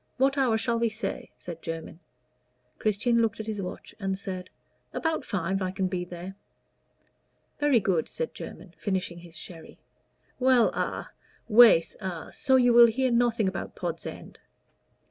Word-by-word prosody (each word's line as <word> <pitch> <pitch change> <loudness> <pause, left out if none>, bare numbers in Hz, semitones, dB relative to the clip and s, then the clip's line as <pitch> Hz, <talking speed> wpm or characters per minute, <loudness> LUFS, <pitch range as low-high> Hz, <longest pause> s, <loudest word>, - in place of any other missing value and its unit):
what 270 +2 +3
hour 255 -5 +2
shall 230 +1 0
we 230 0 +2
say?" 220 +2 -5
said 170 -2 -8
Jermyn. 165 0 -6 0.8
Christian 230 +3 +2
looked 225 -1 0
at 220 - -4
his 215 -2 -3
watch 180 - -7
and 195 -2 -1
said, 185 -2 -6 0.4
"About 320 -3 -1
five 195 -3 -2
I 185 - 0
can 190 +1 -2
be 180 -1 -2
there." 180 +1 -8 1.3
"Very 290 -5 +4
good," 185 -5 0
said 485 -1 -4
Jermyn, - - -9
finishing 185 -3 -2
his 170 -1 -12
sherry. 165 -3 -11 0.6
"Well 255 -2 +5
a - - -3 0.4
Wace 220 -7 +7
a 180 -4 -5
so 265 - +2
you 245 -2 +5
will 235 0 +9
hear 255 +3 +1
nothing 235 -3 +2
about 190 - -4
Pod's - - -4
End?" - - -9
215 Hz, 155 wpm, -27 LUFS, 185-240 Hz, 1.3 s, will